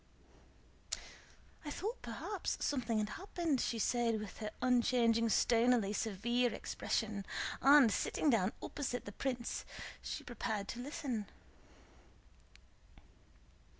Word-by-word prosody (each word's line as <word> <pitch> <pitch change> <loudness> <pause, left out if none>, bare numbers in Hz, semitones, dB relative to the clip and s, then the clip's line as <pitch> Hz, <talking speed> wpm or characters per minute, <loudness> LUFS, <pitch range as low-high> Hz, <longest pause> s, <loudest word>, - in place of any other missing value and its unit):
*Catherine. - - -4 0.6
"I 300 - -5
thought 425 +11 -4
perhaps - - -3
something 240 -5 0
had 210 -1 0
happened," 335 - -1
she 230 - 0
said 230 0 +1
with 210 -2 -7
her 215 - -3
unchanging 235 -2 +3
stonily 230 -1 +4
severe 235 +4 +1
expression; 215 -1 -2 0.4
and, 275 -4 +8
sitting 290 +9 +1
down 205 -4 +3
opposite 245 -5 -3
the 205 - -6
prince, 245 +1 -2 0.4
she - - -5
prepared 220 -4 -3
to 235 - -4
listen. 245 -5 -3
235 Hz, 110 wpm, -36 LUFS, 215-255 Hz, 0.6 s, and